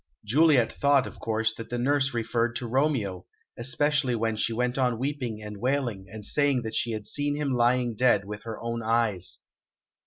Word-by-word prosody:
Juliet 135 Hz, 0 st, +4 dB
thought, 140 Hz, -2 st, +3 dB
of -, -, -10 dB
course, 110 Hz, 0 st, 0 dB
that 115 Hz, 0 st, -9 dB
the 120 Hz, -, -2 dB
nurse 140 Hz, +2 st, +1 dB
referred 115 Hz, 0 st, -1 dB
to 125 Hz, -, -3 dB
Romeo, 120 Hz, -, 0 dB, 0.3 s
especially 130 Hz, +2 st, +1 dB
when 115 Hz, -1 st, 0 dB
she 110 Hz, -, 0 dB
went 125 Hz, +2 st, -1 dB
on 125 Hz, -3 st, +1 dB
weeping 125 Hz, -5 st, -3 dB
and 105 Hz, -1 st, -7 dB
wailing 120 Hz, -5 st, -1 dB
and 110 Hz, -2 st, -7 dB
saying 140 Hz, -2 st, +2 dB
that 110 Hz, -1 st, -5 dB
she 115 Hz, 0 st, 0 dB
had 110 Hz, -1 st, -5 dB
seen 145 Hz, 0 st, -1 dB
him 145 Hz, -2 st, -1 dB
lying 120 Hz, -1 st, +2 dB
dead 105 Hz, -4 st, +3 dB
with 105 Hz, +1 st, -7 dB
her 115 Hz, 0 st, -7 dB
own 115 Hz, 0 st, -3 dB
eyes. 110 Hz, -5 st, 0 dB
120 Hz, 185 wpm, -27 LUFS, 110-135 Hz, 0.3 s, Juliet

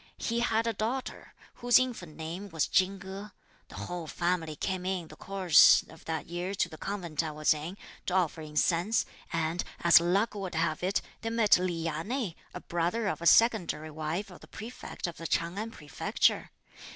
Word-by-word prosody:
He 235 Hz, 0 st, -1 dB
had 230 Hz, -1 st, +1 dB
a 230 Hz, -, 0 dB
daughter, 230 Hz, +5 st, -4 dB, 0.3 s
whose 245 Hz, 0 st, +6 dB
infant 225 Hz, -12 st, -2 dB
name 170 Hz, +5 st, -6 dB
was 160 Hz, -4 st, 0 dB
Chin 190 Hz, +1 st, +2 dB
Ko; 195 Hz, +2 st, -8 dB, 0.4 s
the -, -, -13 dB
whole 175 Hz, -2 st, -5 dB
family 170 Hz, -2 st, -1 dB
came 185 Hz, +3 st, -2 dB
in 185 Hz, -3 st, -2 dB
the 155 Hz, -, -11 dB
course 190 Hz, -2 st, +6 dB
of -, -, -15 dB
that 160 Hz, -1 st, -3 dB
year 175 Hz, +3 st, -4 dB
to -, -, +1 dB
the 155 Hz, -, -11 dB
convent 175 Hz, -7 st, -2 dB
I 160 Hz, -, -3 dB
was 155 Hz, 0 st, +2 dB
in, 155 Hz, +6 st, -6 dB, 0.3 s
to 180 Hz, -, 0 dB
offer 170 Hz, -3 st, +1 dB
incense, 165 Hz, +7 st, +1 dB, 0.3 s
and 165 Hz, +1 st, -1 dB, 0.2 s
as 170 Hz, -1 st, +8 dB
luck 195 Hz, +6 st, +1 dB
would 195 Hz, -4 st, -5 dB
have 160 Hz, -1 st, 0 dB
it 190 Hz, +3 st, 0 dB, 0.2 s
they 225 Hz, -, -2 dB
met 225 Hz, -5 st, +4 dB
Li 175 Hz, -3 st, -2 dB
Ya 160 Hz, -1 st, -2 dB
nei, 230 Hz, -2 st, -2 dB, 0.2 s
a -, -, -7 dB
brother 175 Hz, +6 st, -1 dB
of 195 Hz, -, -2 dB
a 170 Hz, -, +1 dB
secondary 180 Hz, -10 st, +4 dB
wife 160 Hz, +6 st, -3 dB
of 180 Hz, -, -12 dB
the -, -, -15 dB
Prefect 230 Hz, +3 st, -7 dB
of 175 Hz, -2 st, -5 dB
the 165 Hz, -, -5 dB
Ch'ang 170 Hz, +4 st, -1 dB
An 220 Hz, +1 st, -3 dB
Prefecture. 150 Hz, -10 st, 0 dB
180 Hz, 190 wpm, -30 LUFS, 165-205 Hz, 0.4 s, as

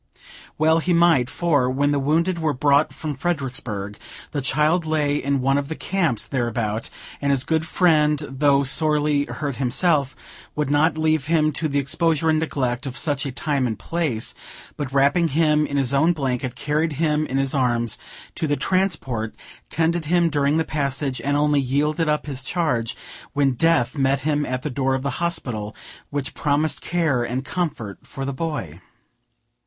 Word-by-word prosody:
Well 160 Hz, +1 st, +4 dB
he 175 Hz, +2 st, 0 dB
might; 165 Hz, -7 st, +4 dB
for, 145 Hz, -7 st, +1 dB
when 140 Hz, +3 st, +1 dB
the 145 Hz, -, +1 dB
wounded 165 Hz, +5 st, +1 dB
were 155 Hz, -3 st, 0 dB
brought 140 Hz, +3 st, +3 dB
from 155 Hz, -2 st, -5 dB
Fredericksburg, 125 Hz, -, -3 dB, 0.3 s
the 145 Hz, -, -2 dB
child 155 Hz, +5 st, +1 dB
lay 150 Hz, -2 st, +1 dB
in 140 Hz, -1 st, 0 dB
one 135 Hz, +2 st, +2 dB
of 140 Hz, -, -4 dB
the 160 Hz, -, -4 dB
camps 165 Hz, -, 0 dB
thereabout, 120 Hz, -4 st, -2 dB, 0.3 s
and 140 Hz, 0 st, +1 dB
this 135 Hz, -2 st, +2 dB
good 160 Hz, +2 st, 0 dB
friend, 155 Hz, -4 st, +3 dB
though 140 Hz, +1 st, +2 dB
sorely 150 Hz, +1 st, +2 dB
hurt 140 Hz, -3 st, -4 dB
himself, 140 Hz, +2 st, +1 dB, 0.4 s
would 150 Hz, -2 st, -1 dB
not 150 Hz, +2 st, +3 dB
leave 155 Hz, -3 st, +1 dB
him 155 Hz, -2 st, +3 dB
to 155 Hz, +2 st, -1 dB
the 145 Hz, -1 st, -1 dB
exposure 160 Hz, +3 st, +1 dB
and 155 Hz, -, +2 dB
neglect 135 Hz, -4 st, -2 dB
of 130 Hz, -, -5 dB
such 145 Hz, -3 st, 0 dB
a -, -, -4 dB
time 140 Hz, 0 st, 0 dB
and 110 Hz, -, -3 dB
place; 155 Hz, -10 st, -1 dB, 0.4 s
but, 140 Hz, -3 st, -4 dB
wrapping 140 Hz, +5 st, +3 dB
him 150 Hz, 0 st, +2 dB
in 140 Hz, -, -2 dB
his 135 Hz, -1 st, +1 dB
own 160 Hz, +5 st, +4 dB
blanket, 130 Hz, -4 st, -2 dB
carried 150 Hz, +3 st, -1 dB
him 155 Hz, 0 st, 0 dB
in 135 Hz, -, -2 dB
his 135 Hz, -1 st, 0 dB
arms 120 Hz, -4 st, 0 dB, 0.3 s
to 160 Hz, -, -2 dB
the 145 Hz, 0 st, 0 dB
transport, 150 Hz, -, -1 dB, 0.3 s
tended 165 Hz, +1 st, 0 dB
him 170 Hz, +1 st, +2 dB
during 145 Hz, 0 st, +2 dB
the 160 Hz, -, +1 dB
passage, 140 Hz, -2 st, -2 dB
and 145 Hz, +1 st, 0 dB
only 150 Hz, 0 st, +3 dB
yielded 150 Hz, +4 st, 0 dB
up 150 Hz, 0 st, 0 dB
his 135 Hz, -3 st, -3 dB
charge 130 Hz, -6 st, -1 dB, 0.4 s
when 140 Hz, -1 st, +2 dB
Death 130 Hz, -2 st, +2 dB
met 135 Hz, -1 st, +1 dB
him 145 Hz, 0 st, 0 dB
at 130 Hz, 0 st, -3 dB
the 150 Hz, -, -3 dB
door 130 Hz, +1 st, 0 dB
of 130 Hz, -, -3 dB
the 140 Hz, -, -3 dB
hospital 120 Hz, -11 st, -2 dB, 0.3 s
which 140 Hz, -2 st, -3 dB
promised 150 Hz, +1 st, 0 dB
care 160 Hz, -8 st, 0 dB
and 125 Hz, +3 st, -3 dB
comfort 135 Hz, -, -3 dB
for 135 Hz, -, -7 dB
the 140 Hz, -, -3 dB
boy. 130 Hz, -, -4 dB
145 Hz, 175 wpm, -22 LUFS, 130-155 Hz, 0.4 s, Well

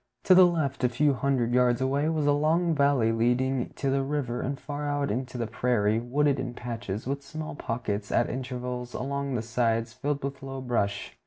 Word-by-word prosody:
To 185 Hz, -, +6 dB
the 185 Hz, 0 st, +8 dB
left, 145 Hz, -6 st, -1 dB
a 125 Hz, -, +4 dB
few 140 Hz, +4 st, +2 dB
hundred 125 Hz, -2 st, 0 dB
yards 125 Hz, -1 st, +3 dB
away, 140 Hz, +4 st, +1 dB
was 155 Hz, -2 st, 0 dB
a 145 Hz, -, +4 dB
long 160 Hz, +4 st, +2 dB
valley 140 Hz, -6 st, +3 dB
leading 125 Hz, +3 st, +1 dB
to 135 Hz, -2 st, -1 dB
the 135 Hz, 0 st, +2 dB
river 135 Hz, -3 st, -2 dB
and 140 Hz, +1 st, -3 dB
far 145 Hz, +1 st, -4 dB
out 145 Hz, -3 st, 0 dB
into 125 Hz, +3 st, -3 dB
the 120 Hz, -, -1 dB
prairie, 110 Hz, -1 st, +1 dB
wooded 140 Hz, +4 st, +1 dB
in 125 Hz, -2 st, -4 dB
patches, 115 Hz, -4 st, -5 dB
with 140 Hz, +2 st, -2 dB
small 155 Hz, +2 st, -6 dB
pockets 110 Hz, -6 st, -3 dB
at 120 Hz, -, +2 dB
intervals 125 Hz, -1 st, -4 dB
along 140 Hz, 0 st, -2 dB
the 115 Hz, -, -1 dB
sides, 115 Hz, -1 st, 0 dB
filled 145 Hz, +2 st, -2 dB
with 140 Hz, 0 st, -4 dB
low 135 Hz, 0 st, -6 dB
brush. 110 Hz, -6 st, -2 dB
130 Hz, 195 wpm, -27 LUFS, 120-140 Hz, -, the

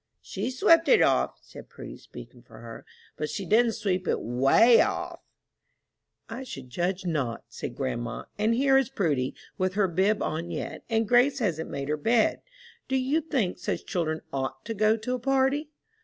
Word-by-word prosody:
"She's 255 Hz, 0 st, -5 dB
swept 330 Hz, 0 st, +5 dB
it 485 Hz, -, +6 dB
off," -, -, +1 dB
said -, -, -13 dB
Prudy, -, -, -10 dB
speaking -, -, -13 dB
for -, -, -16 dB
her, -, -, -11 dB, 0.3 s
"but 150 Hz, -, -3 dB
she 190 Hz, +6 st, -4 dB
didn't 225 Hz, +4 st, +3 dB
sweep 185 Hz, -4 st, -2 dB
it -, -, +1 dB
way 135 Hz, -, +5 dB
off!" -, -, -2 dB, 1.1 s
"I 230 Hz, +3 st, -6 dB
should 135 Hz, -, -9 dB
judge 180 Hz, +5 st, -2 dB
not," 140 Hz, -9 st, -2 dB
said 120 Hz, 0 st, -7 dB
grandma; 120 Hz, -3 st, -4 dB
"and 220 Hz, +2 st, +1 dB
here 270 Hz, +1 st, +4 dB
is 270 Hz, -, -1 dB
Prudy, 150 Hz, -, -1 dB, 0.2 s
with 185 Hz, 0 st, 0 dB
her 205 Hz, -2 st, +3 dB
bib 190 Hz, +5 st, +1 dB
on 165 Hz, +2 st, -3 dB
yet, -, -, -5 dB
and 225 Hz, -1 st, +1 dB
Grace 250 Hz, +4 st, +4 dB
hasn't 170 Hz, -, -2 dB
made 140 Hz, 0 st, -4 dB
her 150 Hz, +1 st, -1 dB
bed. 225 Hz, +8 st, +2 dB, 0.5 s
Do 265 Hz, -, -1 dB
you 265 Hz, +5 st, +1 dB
think 260 Hz, -, -1 dB
such -, -, -3 dB
children 160 Hz, -3 st, -2 dB
ought 135 Hz, -1 st, -4 dB
to 225 Hz, -, -3 dB
go 215 Hz, +1 st, +2 dB
to 225 Hz, +3 st, -3 dB
a 255 Hz, -, -2 dB
party?" 270 Hz, +3 st, +1 dB
205 Hz, 180 wpm, -27 LUFS, 155-250 Hz, 1.1 s, it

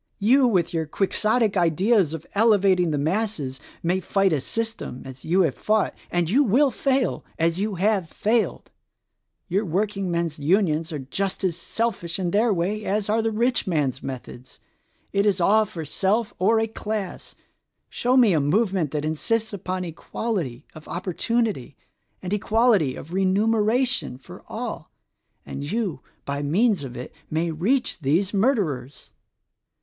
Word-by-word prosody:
You, 250 Hz, +6 st, +4 dB
with 180 Hz, -7 st, +1 dB
your 160 Hz, -2 st, -1 dB
Quixotic 215 Hz, +5 st, +1 dB
ideas 180 Hz, 0 st, +2 dB
of 160 Hz, -, -9 dB
elevating 200 Hz, -5 st, +4 dB
the 150 Hz, -, 0 dB
masses, 155 Hz, -4 st, -1 dB, 0.2 s
may 180 Hz, +3 st, +1 dB
fight 195 Hz, -1 st, +1 dB
a 145 Hz, -, 0 dB
system 225 Hz, -, -4 dB
— -, -, -20 dB
as 130 Hz, 0 st, -10 dB
you 180 Hz, +4 st, +3 dB
have 160 Hz, -7 st, +2 dB
fought: 215 Hz, 0 st, +1 dB, 0.2 s
and 175 Hz, -1 st, 0 dB
you 255 Hz, -, +4 dB
will 265 Hz, +4 st, +3 dB
fail 265 Hz, +1 st, 0 dB
— -, -, -33 dB
as 170 Hz, +2 st, -2 dB
you 205 Hz, 0 st, -1 dB
have 190 Hz, -2 st, +1 dB
failed. 220 Hz, +5 st, -1 dB, 0.8 s
Your 195 Hz, +3 st, 0 dB
work 200 Hz, +3 st, 0 dB
ingmen's 170 Hz, -6 st, -2 dB
Unions 165 Hz, 0 st, +1 dB
are 155 Hz, -, -3 dB
just 185 Hz, +10 st, -3 dB
as 180 Hz, -4 st, +1 dB
selfish 175 Hz, -1 st, -2 dB
in 180 Hz, -3 st, -1 dB
their 220 Hz, +4 st, +3 dB
way 200 Hz, +4 st, -1 dB
as 205 Hz, 0 st, -1 dB
are 220 Hz, +2 st, +2 dB
the 225 Hz, -, 0 dB
rich 235 Hz, +2 st, 0 dB
men's 150 Hz, -7 st, 0 dB
methods: 130 Hz, -1 st, -8 dB, 0.5 s
it 200 Hz, -, +3 dB
is 200 Hz, -3 st, +2 dB
all 215 Hz, +5 st, +4 dB
for 165 Hz, -5 st, -7 dB
self 205 Hz, +8 st, 0 dB
or 220 Hz, +5 st, +4 dB
a 225 Hz, -, +2 dB
class. 215 Hz, -3 st, -5 dB, 0.5 s
Show 250 Hz, +2 st, +1 dB
me 235 Hz, -7 st, +6 dB
a 155 Hz, -, +3 dB
movement 185 Hz, +1 st, +1 dB
that 150 Hz, +1 st, -3 dB
insists 220 Hz, +8 st, -1 dB
upon 185 Hz, -1 st, -3 dB
equality 170 Hz, -, -4 dB
of 155 Hz, -, -12 dB
opportunity 185 Hz, -, -2 dB, 0.5 s
and 185 Hz, +2 st, -3 dB
equality 210 Hz, -, +2 dB
of 165 Hz, -, -9 dB
remuneration 215 Hz, -, +2 dB
for 130 Hz, -, -13 dB
all, -, -, -5 dB, 0.6 s
and 145 Hz, +3 st, -5 dB
you 205 Hz, -, -2 dB, 0.2 s
by 140 Hz, 0 st, -3 dB
means 190 Hz, +5 st, +2 dB
of 125 Hz, -3 st, -7 dB
it 125 Hz, -, -7 dB, 0.2 s
may 165 Hz, +2 st, 0 dB
reach 210 Hz, -, 0 dB
these 170 Hz, +8 st, +1 dB
murderers! 195 Hz, -, -1 dB
190 Hz, 155 wpm, -24 LUFS, 160-220 Hz, 0.8 s, me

